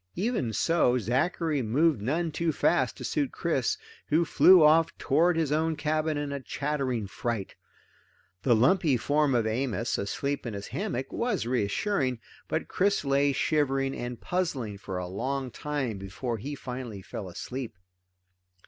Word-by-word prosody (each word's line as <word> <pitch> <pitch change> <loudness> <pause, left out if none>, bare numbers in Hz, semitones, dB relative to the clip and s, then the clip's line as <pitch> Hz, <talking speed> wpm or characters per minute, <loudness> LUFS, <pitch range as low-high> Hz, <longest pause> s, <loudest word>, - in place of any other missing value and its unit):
Even 195 - -1
so, 125 - +2
Zachary 140 - 0
moved 130 +3 +2
none 160 +9 0
too 165 +1 0
fast - - +1
to - - -8
suit 290 -4 -1
Chris, - - 0 0.3
who 160 +3 +3
flew 180 +2 +7
off 160 +2 +4
toward 165 +4 +2
his 160 -3 0
own 160 +1 +1
cabin 155 0 0
in 145 -1 -3
a 140 - -3
chattering 135 -5 -2
fright. 105 0 -3 0.9
The 120 -3 +4
lumpy 145 - +3
form 145 +2 +2
of 115 -2 +2
Amos, 115 0 -1
asleep 140 +7 -2
in 110 - -4
his 100 0 -6
hammock, 180 - -3
was 235 - -1
reassuring, 130 - 0 0.3
but - - -2
Chris 200 -3 +1
lay 140 +1 +3
shivering 135 -2 +1
and 120 -1 -5
puzzling 135 - -2
for 95 -2 -5
a 90 - -3
long 130 +8 -3
time 135 -7 -3
before 110 +4 -4
he 145 +7 -5
finally 125 -7 -6
fell 95 0 -6
asleep. 120 +4 -6
135 Hz, 150 wpm, -28 LUFS, 120-155 Hz, 0.9 s, flew